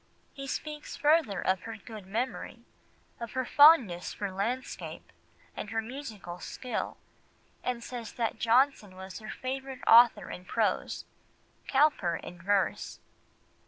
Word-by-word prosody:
He 275 -1 -7
speaks 300 +2 -5
further 295 - +3
of 185 -1 +1
her 225 +2 -7
good 210 -2 -10
memory, 235 +6 -3 0.6
of 235 -2 -6
her 260 -1 -1
fondness 255 - +6
for 200 -2 -3
landscape, 230 +7 -4 0.4
and 210 - -5
her 225 - -1
musical 220 -7 -7
skill, 250 +6 -4 0.7
and 245 -2 -2
says 235 -3 -6
that 225 -1 -2
Johnson 235 -4 +3
was 190 +2 -8
her 215 -1 -9
favourite 265 +2 -5
author 235 +1 +7
in 180 - -8
prose, - - -1 0.6
Cowper 265 - +3
in 175 +1 -9
verse. 195 -1 0
230 Hz, 125 wpm, -30 LUFS, 195-265 Hz, 0.7 s, author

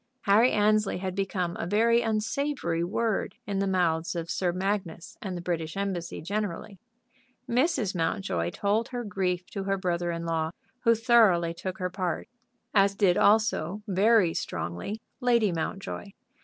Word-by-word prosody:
Harry 220 +4 +5
Annesley 210 0 +2
had 185 0 -3
become 185 -2 -2
a - - -2
very 230 +4 +3
unsavory 220 - -1
word 215 +4 -1
in 200 -2 -2
the 195 - +1
mouths 175 -3 +1
of 170 0 -3
Sir 180 -2 0
Magnus 185 -3 -3
and 185 -3 -4
the 175 - -7
British 165 -1 -3
Embassy 190 -6 -3
generally. 200 +1 -4 0.7
Mrs. 245 - +1
Mountjoy 165 - -1
told 210 - 0
her 245 -1 -4
grief 185 -4 -1
to 195 -1 -4
her 195 0 +1
brother 175 -2 -1
in 170 0 -3
law, 160 -1 0 0.4
who 230 0 +6
thoroughly 215 -8 +4
took 185 +2 -5
her 180 -1 -3
part, 185 -2 -2 0.5
as 200 -1 +4
did 195 -3 +3
also, 210 -3 +2
very 200 -2 +4
strongly, 85 - -4 0.2
Lady 235 -5 +3
Mountjoy. 190 +4 -4
195 Hz, 150 wpm, -28 LUFS, 175-215 Hz, 0.7 s, who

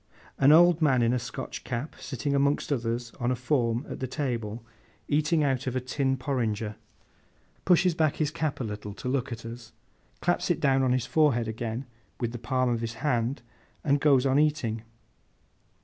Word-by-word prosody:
An 135 +1 +6
old 170 +1 +6
man 130 -6 +4
in 115 +1 +3
a 125 - +1
Scotch 115 +1 -6
cap 130 +4 -4
sitting 140 +2 -3
among 140 +1 +3
others 120 -2 -1
on 120 - 0
a 130 - +1
form 125 -1 0
at - - -6
the 130 - -2
table, 120 -5 -3 0.4
eating 155 +2 +2
out 135 -1 0
of 130 - -2
a - - +2
tin 130 +1 -1
porringer, 115 -6 -2 0.9
pushes 180 0 +4
back 155 -2 +1
his 150 -2 0
cap 155 -3 -2
a - - -2
little 105 -2 -6
to 125 - -7
look 130 0 -1
at 115 -1 -6
us, 115 -1 -9 0.5
claps - - 0
it - - +1
down 135 -1 +3
on 130 -1 +2
his 125 -1 +1
forehead 140 -8 +2
again 115 +3 -4 0.3
with 120 -2 -1
the 120 - -6
palm 130 +3 0
of 115 -1 -1
his 115 0 -4
hand, 120 -2 0 0.4
and 140 -2 +2
goes 140 -3 +4
on 135 +1 +3
eating. 145 -8 +1
130 Hz, 185 wpm, -27 LUFS, 115-145 Hz, 0.9 s, An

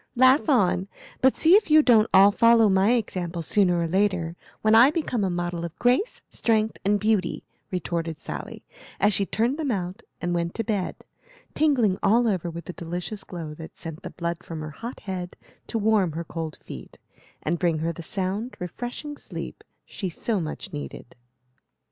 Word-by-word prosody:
"Laugh 260 +5 +5
on, 190 -7 +3 0.3
but 260 0 +4
see 325 +2 +5
if 410 -3 +5
you 310 0 +7
don't 225 -4 +5
all 195 +2 +7
follow 230 +1 +5
my 195 +4 +4
example 180 -7 -2
sooner 180 0 +3
or 170 - 0
later, 180 -2 0 0.3
when 215 0 +4
I 235 +4 +8
become 295 -8 -1
a 190 - +1
model 175 -1 -2
of 170 0 -6
grace, 250 - +1
strength, 220 -1 0
and 205 +1 +2
beauty," 210 -4 0 0.3
retorted 170 -3 -3
Sally, - - -7 0.4
as 205 - +3
she 200 -1 0
turned 240 +7 0
them 300 -3 -1
out 190 -1 -3 0.2
and 175 0 -2
went 170 0 -2
to 225 - -1
bed, 205 -5 -3 0.5
tingling 245 -11 +2
all 230 +4 +4
over 185 -5 0
with 170 +1 -8
a 180 - -5
delicious 175 +5 -5
glow 165 -4 -7
that 160 +1 -11
sent 165 -2 -7
the - - -6
blood 170 0 -4
from 160 -2 -6
her 155 0 -6
hot 230 - -8
head 180 -2 -5 0.3
to 230 - -2
warm 210 -6 +2
her 165 +2 -3
cold 160 -1 -6
feet, - - -10 0.5
and 170 +2 -1
bring 170 -3 +1
her 165 +2 -1
the 170 - -8
sound, 195 +7 -3
refreshing 245 - -6
sleep - - -7 0.2
she 190 - -5
so 210 +5 -2
much 155 0 -6
needed. 145 -4 -7
190 Hz, 180 wpm, -25 LUFS, 170-230 Hz, 0.5 s, I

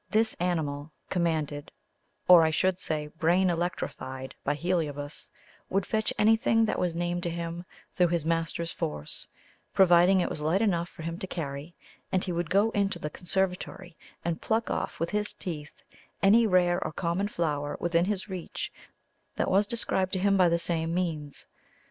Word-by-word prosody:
This 220 +3 +3
animal, 155 -4 -1 0.2
commanded 155 -5 -1 0.6
or, 180 -2 +9
I 160 - +4
should 185 +4 +1
say, 155 -4 -2
brain 170 +4 +2
electrified 165 -6 -4
by 145 - 0
Heliobas, 150 -4 -2 0.4
would 195 -1 +1
fetch 220 0 0
anything 225 +1 +4
that 215 - -1
was 175 -2 0
named 175 +1 -1
to 175 - -1
him 170 +1 -4 0.3
through 180 - +3
his 170 -2 -1
master's 165 0 -1
force, 75 -1 -2 0.5
providing 185 0 +6
it - - +1
was 150 - -5
light 160 +5 +2
enough 175 -5 +1
for 160 - -11
him 165 +2 -4
to 190 - -4
carry; 150 -1 -5 0.4
and 185 - +1
he 185 - -2
would 170 -1 -2
go 200 +5 +3
into 200 -3 0
the 150 -3 -5
conservatory 180 -1 -2 0.3
and 170 -1 -1
pluck 225 +1 0
off - - -3
with 165 +1 -1
his 210 0 -1
teeth 150 -4 -7 0.4
any 220 +4 +6
rare 180 -2 +3
or 155 - -3
common 170 +6 -1
flower 150 -6 -2
within 170 0 +2
his 200 0 -2
reach 185 -4 -5 0.6
that - - 0
was 200 +2 +4
described 190 -4 -1
to 190 - +1
him 200 +1 +3
by 180 -3 +5
the 170 - +3
same 170 -1 -1
means. 155 -6 -3
175 Hz, 170 wpm, -28 LUFS, 160-190 Hz, 0.6 s, or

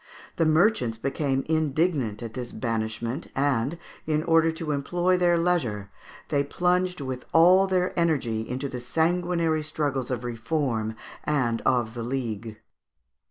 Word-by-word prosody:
The 165 - +3
merchants 155 - +3
became 135 +2 -1
indignant 155 - 0
at 115 -1 -6
this 125 0 -6
banishment, 115 +3 -3
and, 135 +2 +1 0.3
in 155 0 +1
order 165 -1 +4
to 160 -1 -4
employ 175 +6 +1
their 175 -1 +3
leisure, 125 - 0 0.4
they 140 -1 +2
plunged 180 +3 0
with 130 -2 -5
all 180 +4 +6
their 185 -1 +1
energy 140 -10 +1
into 130 +3 -2
the 125 -2 -5
sanguinary 165 +3 +1
struggles 145 -4 -2
of 125 -2 -3
Reform 115 -2 -2 0.3
and 125 -6 0
of 120 -4 +2
the 120 - -5
League. 115 -3 -4
140 Hz, 135 wpm, -26 LUFS, 120-165 Hz, 0.4 s, all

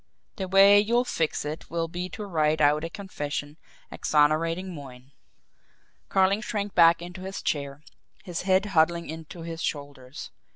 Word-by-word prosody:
"The 190 - -3
way 195 +2 +7
you'll 235 +4 +2
fix 160 -10 -1
it 150 +2 -6
will 165 0 -2
be 175 +2 -5
to 210 - -7
write 155 -4 +1
out 150 +1 +3
a 165 - -3
confession 150 -7 -5 0.3
exonerating 165 +5 +1
Moyne." 135 -3 -11 1.0
Carling 195 +2 +3
shrank 205 -2 -3
back 170 0 +5
into 180 +1 -9
his 190 +1 -6
chair, 140 0 -3 0.4
his 175 -3 -4
head 190 +1 +2
huddling 170 +1 +2
into 160 +2 -8
his 165 0 -6
shoulders. 140 -2 -6
165 Hz, 150 wpm, -26 LUFS, 150-190 Hz, 1.0 s, way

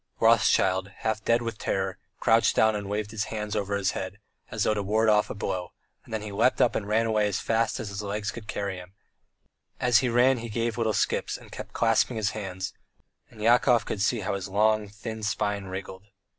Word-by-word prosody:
Rothschild, 100 -4 +4
half 110 -1 -1
dead 115 +1 +2
with 115 -2 -5
terror, 95 -1 -2 0.2
crouched 115 0 +3
down 110 -1 +4
and 100 -1 -4
waved 105 0 -2
his 110 -2 -2
hands 105 -1 -4
over 100 -1 -1
his 100 -1 +1
head, 95 +1 -5 0.3
as 110 -1 -1
though - - +2
to 105 - -1
ward 110 +3 +2
off 105 -1 +3
a - - -5
blow; 90 -3 -3 0.3
then 110 -1 -4
he 105 - -6
leapt 110 +6 +2
up 120 - +3
and 100 - -2
ran 110 +2 +2
away 110 -2 +2
as 100 - -1
fast 115 0 0
as 105 - -4
his 100 +1 -5
legs 105 +1 -3
could 115 -2 -10
carry 100 -3 -3
him: 90 +1 -12 0.8
as 120 -4 +4
he 125 - 0
ran 125 +2 +4
he 115 0 -6
gave 115 +1 -1
little 115 -2 0
skips - - 0
and - - -16
kept - - -8
clasping 115 +1 +2
his 105 -2 0
hands, 95 -3 -5 0.6
and 110 -2 -10
Yakov 120 -1 +4
could 100 - -3
see 110 +3 +1
how 100 +1 -2
his 100 0 -4
long 105 +1 +2
thin 110 +2 -7
spine 105 -1 -1
wriggled. 95 +1 -7
105 Hz, 210 wpm, -27 LUFS, 100-115 Hz, 0.8 s, Rothschild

